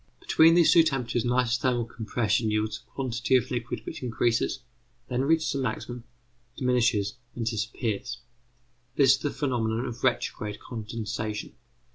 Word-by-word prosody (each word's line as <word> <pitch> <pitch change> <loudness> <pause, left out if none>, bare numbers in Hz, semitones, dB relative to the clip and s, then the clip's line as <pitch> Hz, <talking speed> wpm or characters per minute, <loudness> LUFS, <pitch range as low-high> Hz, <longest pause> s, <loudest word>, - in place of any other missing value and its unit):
Between 165 +1 +5
these 170 -2 +6
two 170 - +8
temperatures 125 -7 0
an - - +1
isothermal 125 -1 +1
compression 110 -1 0
yields 110 0 -1
a - - -27
quantity 125 -1 0
of 125 - +1
liquid 120 -2 -3
which - - -6
increases, 120 -1 0 0.5
then 125 +1 0
reaches 160 +1 +2
a 140 - -2
maximum, 125 -2 -4 0.5
diminishes, 120 -5 +1 0.2
and 115 - -3
disappears. 110 +2 -2 0.8
This 135 -3 +6
is - - +5
the 145 - -1
phenomenon 120 -5 -1
of 120 -1 -7
retrograde 105 -4 -1
condensation. 110 -2 -5
120 Hz, 140 wpm, -27 LUFS, 110-130 Hz, 0.8 s, two